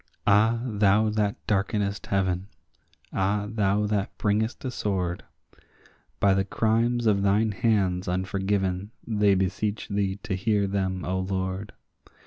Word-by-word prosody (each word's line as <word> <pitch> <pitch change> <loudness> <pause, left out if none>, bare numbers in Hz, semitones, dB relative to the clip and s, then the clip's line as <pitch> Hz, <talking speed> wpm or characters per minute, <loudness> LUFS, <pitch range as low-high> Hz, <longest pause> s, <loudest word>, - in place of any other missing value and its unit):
Ah, 110 +3 +4
thou 105 -1 +3
that 105 -1 0
darkenest 100 -1 -1
heaven—ah, 95 +2 -3
thou 105 -1 +1
that 105 -1 -2
bringest 110 +5 0
a 130 - -2
sword— 95 -6 -2 1.0
By 100 -1 +4
the 95 0 +2
crimes 115 +4 +1
of 100 -3 +3
thine 105 +3 +2
hands 95 -4 +1
unforgiven 95 +1 -1 0.2
they 105 -3 +3
beseech 100 +3 -1
thee 100 -2 0
to 95 - -3
hear 100 +2 +1
them, 95 -2 -2
O 95 +1 -1
Lord. 95 +1 -3
100 Hz, 120 wpm, -26 LUFS, 95-105 Hz, 1.0 s, Ah